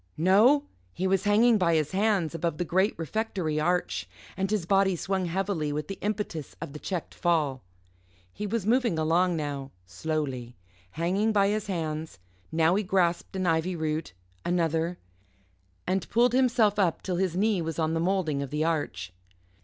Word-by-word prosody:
No 210 - +5 0.3
he 185 - -3
was 190 +1 +1
hanging 220 +2 +5
by 170 -3 +3
his 155 -2 0
hands 195 -5 +1
above 165 -1 -2
the 175 - -1
great 190 +5 +2
refectory 165 -3 -2
arch, 175 +3 0 0.3
and 195 0 -1
his 210 -5 0
body 195 0 +3
swung 190 +2 -1
heavily 175 -3 -1
with 150 +1 -3
the 195 - -6
impetus 205 -8 -3
of 140 - -7
the 150 - -7
checked 180 -1 -4
fall. 155 -7 0 0.7
He 210 - -4
was 220 -1 -2
moving 235 -5 +2
along 170 +3 +2
now, 145 -3 -4 0.2
slowly 125 - -3 0.4
hanging 190 +7 +1
by 200 -2 +3
his 210 0 -1
hands; 160 - -3 0.3
now 160 +1 +3
he 200 - +2
grasped 180 -3 0
an 185 -1 -1
ivy 165 +2 +1
root 155 - -2 0.3
another 170 0 0 0.9
and 185 0 -1
pulled 240 +1 +3
himself 235 -5 +3
up 180 -5 +1
till 180 -2 -2
his 185 -2 0
knee 205 -1 +2
was 165 -1 -4
on 160 -1 0
the 165 - 0
moulding 170 -5 0
of 140 - -4
the 150 +2 -1
arch. 95 - -2
175 Hz, 170 wpm, -27 LUFS, 160-195 Hz, 0.9 s, No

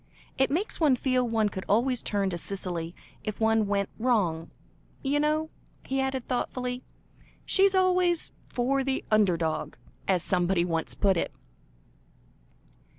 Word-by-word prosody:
It 265 - +2
makes 360 +9 -1
one 300 -5 +4
feel 255 -1 +1
one 220 -2 +2
could 190 -1 -6
always 240 +4 +2
turn 200 -2 0
to 175 - -2
Cicely 175 -3 -3 0.3
if 215 - -4
one 220 -1 +3
went 200 -1 0
wrong, 190 -10 +1 0.5
you 285 +1 +1
know," 310 +1 +1 0.3
he 270 0 0
added 265 -2 -2
thoughtfully; 250 0 -2 0.6
"she's 390 0 +4
always 365 -2 +2 0.2
'for 265 +2 +1
the 265 0 -2
under 205 -5 +4
dog,' 160 -1 -2 0.3
as 185 -3 +2
somebody 180 -1 +1
once 165 -2 -2
put 195 -3 +2
it." - - -1
230 Hz, 140 wpm, -28 LUFS, 190-270 Hz, 0.6 s, one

